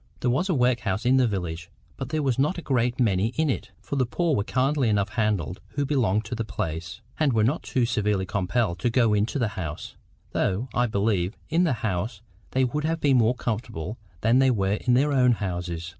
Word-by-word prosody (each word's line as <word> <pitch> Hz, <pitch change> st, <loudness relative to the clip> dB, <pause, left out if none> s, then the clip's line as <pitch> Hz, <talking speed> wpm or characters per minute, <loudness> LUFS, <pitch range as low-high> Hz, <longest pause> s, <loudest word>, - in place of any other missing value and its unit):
There 120 Hz, -, +2 dB
was 175 Hz, +10 st, 0 dB
a 180 Hz, -, +2 dB
workhouse 120 Hz, -4 st, +1 dB
in 130 Hz, +2 st, +4 dB
the 130 Hz, -2 st, +4 dB
village, 85 Hz, -5 st, -4 dB, 0.3 s
but 130 Hz, -, -6 dB
there 155 Hz, 0 st, -1 dB
were 135 Hz, -2 st, +2 dB
not 150 Hz, +7 st, +2 dB
a 170 Hz, -, -6 dB
great 125 Hz, -2 st, 0 dB
many 105 Hz, -4 st, +2 dB
in 155 Hz, -2 st, +2 dB
it; -, -, -4 dB
for 140 Hz, -, -5 dB
the 130 Hz, -, +3 dB
poor 165 Hz, +3 st, 0 dB
were 100 Hz, -, +1 dB
kindly 130 Hz, +2 st, +1 dB
enough 100 Hz, -1 st, +1 dB
handled 105 Hz, -6 st, -1 dB
who 145 Hz, -1 st, 0 dB
belonged 115 Hz, -7 st, +1 dB
to -, -, -5 dB
the 115 Hz, -1 st, -2 dB
place, 85 Hz, -4 st, -4 dB, 0.2 s
and 150 Hz, -5 st, +3 dB
were 110 Hz, -2 st, +3 dB
not 135 Hz, +9 st, +1 dB
too 125 Hz, -2 st, 0 dB
severely 105 Hz, -4 st, 0 dB
compelled 100 Hz, 0 st, -1 dB
to 120 Hz, -, +1 dB
go 115 Hz, -2 st, +3 dB
into 105 Hz, +6 st, +1 dB
the 120 Hz, -5 st, +1 dB
house; 80 Hz, -7 st, -6 dB, 0.4 s
though, 105 Hz, +7 st, -1 dB
I 120 Hz, 0 st, +2 dB
believe, 100 Hz, -3 st, 0 dB
in 170 Hz, +3 st, +3 dB
this 145 Hz, -7 st, +1 dB
house 100 Hz, +1 st, -2 dB, 0.3 s
they 130 Hz, -, +1 dB
would 150 Hz, +4 st, -1 dB
have 165 Hz, +1 st, 0 dB
been 140 Hz, -4 st, +3 dB
more 120 Hz, +1 st, +3 dB
comfortable 110 Hz, -4 st, -4 dB, 0.2 s
than 115 Hz, +4 st, +4 dB
they 135 Hz, 0 st, +5 dB
were 100 Hz, -5 st, +1 dB
in 125 Hz, -, +3 dB
their 145 Hz, +3 st, +3 dB
own 125 Hz, -2 st, +5 dB
houses. 85 Hz, -5 st, -4 dB
115 Hz, 220 wpm, -25 LUFS, 100-130 Hz, 0.4 s, they